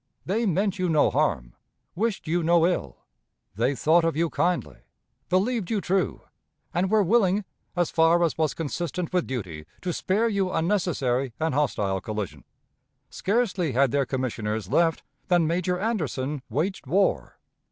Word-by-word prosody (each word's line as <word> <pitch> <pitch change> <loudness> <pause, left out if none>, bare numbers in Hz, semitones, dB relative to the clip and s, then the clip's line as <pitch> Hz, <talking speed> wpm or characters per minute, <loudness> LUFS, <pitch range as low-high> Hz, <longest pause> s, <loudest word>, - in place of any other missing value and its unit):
They 220 +5 0
meant 195 +2 0
you 180 -1 +1
no 155 -2 +3
harm, 80 - 0 0.4
wished 210 +1 -2
you 175 +2 +1
no 170 0 +4
ill. 170 - -2 0.5
They 120 +7 0
thought 165 +5 +3
of 165 -2 +1
you 165 0 0
kindly, 180 0 -1 0.5
believed 195 +2 +1
you 220 - +1
true, 190 0 -1 0.5
and 185 +2 +1
were 215 0 +4
willing, 200 0 +2 0.3
as 175 -2 +1
far 165 +1 +4
as 165 - +1
was 155 -2 0
consistent 170 +2 -3
with 180 -2 +1
duty, 90 -12 -5 0.2
to 180 -1 -1
spare 210 +8 +1
you 200 -4 0
unnecessary 145 - 0
and 160 -2 0
hostile 100 -9 0
collision. 105 -3 -5 0.7
Scarcely 190 - 0
had 135 0 +3
their 140 0 +1
commissioners 110 -6 -3
left, 165 -2 +2 0.2
than 175 -2 +3
Major 180 +2 0
Anderson 150 - -2
waged 155 - -2
war. 195 +7 +1
170 Hz, 150 wpm, -25 LUFS, 135-185 Hz, 0.7 s, no